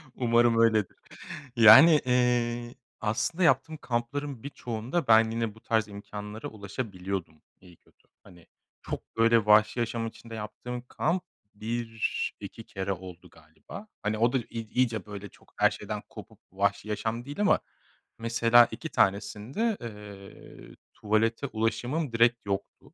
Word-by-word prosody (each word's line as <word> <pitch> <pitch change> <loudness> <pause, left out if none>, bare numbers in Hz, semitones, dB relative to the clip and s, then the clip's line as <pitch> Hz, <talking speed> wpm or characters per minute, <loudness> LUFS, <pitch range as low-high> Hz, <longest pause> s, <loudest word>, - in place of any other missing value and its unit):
Umarım 120 -1 +3
öyledir. 110 -4 +2 0.6
Yani, 130 +8 +9
iii, 120 -1 +1 0.3
aslında 165 +12 -1
yaptığım 155 +2 +2
kampların 130 +1 -4
birçoğunda 125 +2 -4
ben 110 0 +5
yine 115 -2 -2
bu 110 - -18
tarz 110 -2 0
imkânlara 105 +1 -8
ulaşabiliyordum 95 - -6 0.2
iyi 90 -3 -17
kötü. - - -32 0.2
Hani 85 -4 -17 0.3
çok, - - -7
böyle, 115 -1 +4
vahşi 110 +3 +4
yaşam 115 0 -2
içinde 115 0 -10
yaptığım 120 +3 -6
kamp 170 +3 -1 0.3
1-2 115 +1 -4
kere 95 0 -4
oldu 90 -1 -11
galiba. 80 - -13 0.2
Hani 105 +1 -1
o 115 +3 +2
da 130 - +3
i 120 - -3
i 115 -2 -6
iyice, 115 -5 +1
böyle, 100 -1 -8
çok - - -24
her - - +4
şeyden - - -6
kopup - - -12
vahşi 100 +2 -1
yaşam 110 +3 -3
değil 145 +7 -5
ama 205 - +4 0.6
mesela 115 +1 +5
2 125 +8 -6
tanesinde, 115 - 0
eee, 105 -3 -11 0.2
tuvalete 115 +5 0
ulaşımım 120 +6 -2
direkt 115 -1 +3
yoktu. 100 0 -5
115 Hz, 135 wpm, -28 LUFS, 105-120 Hz, 0.6 s, Yani